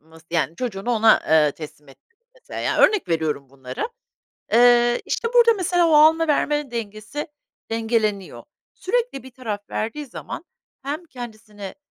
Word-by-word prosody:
ması, 160 +1 -19
yani, 165 -1 0
çocuğunu 240 -2 -3
ona, 225 -1 +5
ııı, 150 -2 +5
teslim 150 -2 -11
ettin, 135 - -20 0.2
mesela, - - -8
ya, - - -1
örnek 410 - +4
veriyorum 155 -4 -1
bunları, 130 - -5 0.7
ııı, 240 0 +5
işte, 460 - -1
burada, 470 -1 +6
mesela, 355 -3 +2
o 315 - +3
alma 320 +2 +6
vermenin 295 -2 0
dengesi 220 +6 -5 0.4
dengeleniyor. 220 -4 -1 0.3
Sürekli 460 - -2
bir 260 - -12
taraf 215 -5 -6
verdiği 290 +7 -3
zaman, - - -8 0.4
hem 300 +5 -4
kendisini 215 - -9
230 Hz, 140 wpm, -22 LUFS, 190-295 Hz, 0.7 s, burada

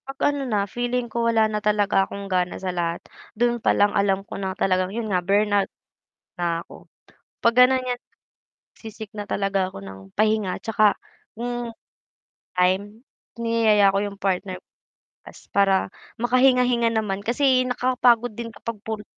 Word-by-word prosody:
'Pag 270 0 -7 0.2
ano 285 - -3
na 205 -3 +1
feeling 245 +3 -2
ko 230 +1 0
wala 225 -1 +4
na 210 -1 -2
talaga 210 -2 +2
akong 200 0 -6
gana 180 -2 -1
sa 185 -1 -4
lahat, 170 -1 -2 0.4
doon 240 0 +1
pa - - +3
lang 205 0 +3
alam 195 -1 +1
ko - - -11
na 190 -1 -3
talagang 185 -1 +1
'yun 220 +2 -4
nga 180 - +2
burnout 200 +1 +2 0.7
na'ko, 170 -1 -4 0.6
'pag 235 0 +4
gano'n 260 0 0
'yan 250 -1 -3 0.8
se-seek 220 -1 -10
na 205 - -4
talaga 195 -2 -1
ako - - -9
ng 95 -1 -10 0.2
pahinga 215 -3 +1
'tsaka 215 -2 +2 0.4
hmm, 240 0 -3 0.9
time, 200 +5 0 0.4
niyayaya 220 -4 +3
ko - - +1
'yung 200 -1 -6
partner 190 -1 -1
ko - - -50 0.6
lumabas - - -12 0.2
para 200 -1 +4 0.4
makahinga-hinga 250 -1 +3
naman 205 -3 -1
kasi 255 +3 +3
nakakapagod 245 -2 +2
din 230 0 -6
kapag 230 0 -6
puro 220 -1 -5
210 Hz, 155 wpm, -23 LUFS, 195-235 Hz, 0.9 s, wala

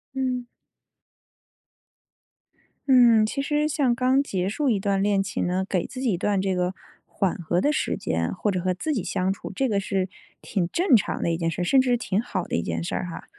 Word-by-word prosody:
嗯。 255 -2 -1 2.4
嗯， 240 -4 +6
其 220 +6 -2
实 295 +1 0
像 275 -5 +1
刚 260 +3 +2
结 190 -7 -2
束 270 +6 0
一 210 - +2
段 195 0 0
恋 200 -1 +2
情 195 - -2
呢， 180 +2 0
给 185 -4 -1
自 255 - -7
己 255 -4 +1
一 - - -1
段 200 +1 0
这 190 -1 0
个 180 +1 0 0.3
缓 195 -3 -1
和 175 +1 0
的 295 - +2
时 - - -1
间， 85 0 -1
或 210 - -1
者 185 - -1
和 185 +1 0
自 305 - -2
己 225 -10 -2
相 185 +1 -1
处， 195 - -6
这 265 +4 +1
个 205 -2 +1
是 195 -1 -1 0.3
挺 185 -5 -1
正 340 - +3
常 205 - 0
的 170 - +1
一 165 - -1
件 165 -1 -1
事， 180 - -2
甚 265 +9 +4
至 255 - 0
是 245 - +3
挺 205 -4 -1
好 185 -6 -3
的 - - -3
一 85 - 0
件 85 -1 -3
事 - - -3
儿 - - -2
哈。 175 - -8
200 Hz, 240 characters per minute, -25 LUFS, 180-255 Hz, 2.4 s, 嗯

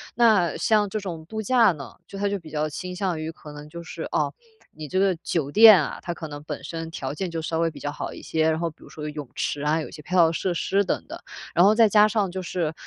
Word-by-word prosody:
那 220 -7 +4
像 210 -2 +2
这 215 - -2
种 170 -6 -6
度 220 +5 -5
假 230 0 +4
呢， 145 -5 -9
就 195 - -9
它 205 - +1
就 200 0 -1
比 165 -4 -12
较 155 0 -1
倾 180 +4 -6
向 180 -3 -1
于 160 +1 -4
可 150 -2 -12
能 150 0 -10
就 170 +2 -8
是， 170 - -7
哦， - - 0 0.4
你 155 -1 -8
这 185 - 0
个 195 -1 +3
酒 145 -5 -1
店 215 -1 +9
啊， 145 - -4
它 175 - -4
可 165 -1 -7
能 145 -1 -8
本 150 -1 -6
身 165 +1 -6
条 135 -4 -4
件 175 +4 -4
就 165 -1 -3
稍 160 0 -2
微 165 0 +1
比 - - -11
较 145 - -3
好 - - -5
一 - - -10
些， 160 0 +1
然 160 - -1
后 170 0 -1
比 155 - -18
如 - - -14
说 150 - -9
有 - - -3
泳 150 -3 -7
池 145 - -2
啊， 150 +2 +1
有 - - -6
一 - - -15
些 155 - -9
配 180 +5 -4
套 165 -3 +6
设 180 +2 -1
施 195 +4 +1
等 185 - -2
等。 - - -7 0.4
然 175 - +6
后 205 - +6
再 225 0 +6
加 210 +1 +6
上 210 -3 0
就 190 +1 -4
是， 170 -3 -2
170 Hz, 310 characters per minute, -24 LUFS, 155-195 Hz, 0.4 s, 店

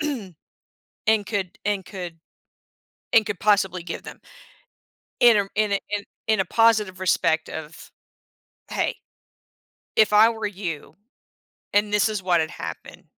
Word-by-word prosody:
and 225 - -5 0.8
could 195 -5 -3
and 200 -2 -1
could 175 -4 -7 0.9
and 225 -2 +5
could 205 -4 -4
possibly 195 -4 +2
give 170 0 -6
them. - - -10 1.0
In, 240 -2 +7
um 200 -1 0
in 215 -1 +1
a 200 - +2
in 205 -1 -2 0.2
in 220 -2 +2
a - - +2
positive 215 -5 +2
respect 165 -3 +1
of, 160 0 -8 0.8
"Hey, - - -1 1.0
if 215 -1 +5
I 215 +2 +7
were 225 -2 -3
you, 180 -7 -6 0.8
and 205 0 +2
this 210 +1 +3
is 210 -2 -3
what 180 -3 +2
had 155 - -3
happened, - - -8
200 Hz, 135 wpm, -24 LUFS, 180-215 Hz, 1.0 s, In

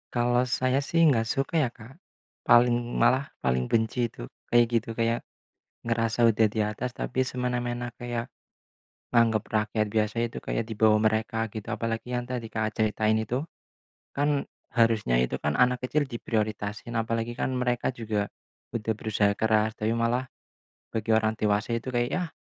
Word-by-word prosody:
Kalau 120 0 +2
saya 130 +2 +1
sih 165 +3 +3
enggak 120 -6 +3
suka 135 +7 -2
ya, 150 -6 +3
Kak. 120 +2 -14 0.5
Paling, 120 0 +4
malah 135 +2 +3
paling 65 -1 0
benci 115 +1 +1
itu - - -8 0.2
kayak 120 0 +6
gitu. 115 -1 -1
Kayak 115 +1 0 0.6
ngerasa 115 0 +2
udah 110 0 +3
di 110 +1 0
atas 105 +4 -2
tapi 130 +1 -1
semena-mena, 120 -1 -2
kayak 120 -1 -4 0.9
nganggap 115 -2 +4
rakyat 110 0 0
biasa 105 +1 0
itu 115 - -9
di 115 -1 -3
bawah 110 0 +4
mereka 110 +1 +1
gitu, 110 -2 -6
apalagi 115 +1 -3
yang 125 0 -1
tadi 120 -3 -4
Kakak 110 -1 -1
ceritain 110 0 +1
itu. 120 +7 -2 0.6
Kan, 145 0 +1 0.3
harusnya 110 - +3
itu 65 - 0
kan 75 - -1
anak 125 +7 +2
kecil 150 +4 +1
diprioritasin, 110 -1 -3
apalagi 115 +1 -2
mereka 125 -1 0
juga 110 -4 -2 0.5
udah 110 -1 -1
berusaha 105 -2 +1
keras, 110 0 +2
tapi 110 +1 0
malah 115 +2 0 0.7
bagi 110 0 -2
orang 110 0 +3
dewasa 105 +1 0
itu 115 +3 -3
kayak 120 -1 0
yah, 180 -2 -1
115 Hz, 155 wpm, -27 LUFS, 110-125 Hz, 0.9 s, kayak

